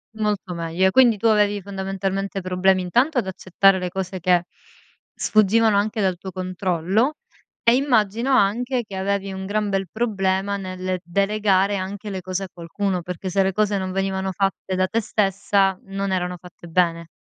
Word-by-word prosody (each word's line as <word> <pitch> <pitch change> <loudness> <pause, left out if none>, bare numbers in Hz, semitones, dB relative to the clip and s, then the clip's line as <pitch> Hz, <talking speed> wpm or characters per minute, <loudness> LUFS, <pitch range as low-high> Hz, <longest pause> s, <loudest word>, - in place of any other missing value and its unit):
Molto 210 -4 -2
meglio. 170 +3 +1
Quindi, 240 -1 +5
tu 225 +3 +1
avevi 205 -1 +3
fondamentalmente 195 0 -3
problemi 185 +1 +2
intanto 245 - +1
ad 215 -6 +1
accettare 190 +1 +2
le 180 -1 -3
cose 190 0 -4
che 175 0 +2 0.7
sfuggivano 215 0 +3
anche 215 +2 0
dal 190 -2 +1
tuo 190 +1 -8
controllo, 185 - 0 0.5
e 235 +1 +5
immagino, 240 -2 +1
anche 245 +2 +2
che 195 - -8
avevi 195 0 -2
un 190 0 -6
gran 210 +1 -1
bel 195 -1 -1
problema 200 -3 0
nel 185 -1 -4
delegare 200 +1 +1
anche 200 +2 -5
le 190 -2 -4
cose 185 +1 -3
a - - -5
qualcuno, 180 +2 -3
perché 180 +2 -5
se 195 +1 +2
le 190 - +1
cose 210 +1 +1
non 185 -1 -3
venivano 190 0 -1
fatte 195 0 -2
da 185 0 +1
te 230 +3 0
stessa 195 -2 +1
non 195 0 -3
erano 180 -1 -2
fatte 175 0 -14
bene. 170 -1 +1
195 Hz, 165 wpm, -22 LUFS, 185-205 Hz, 0.7 s, Quindi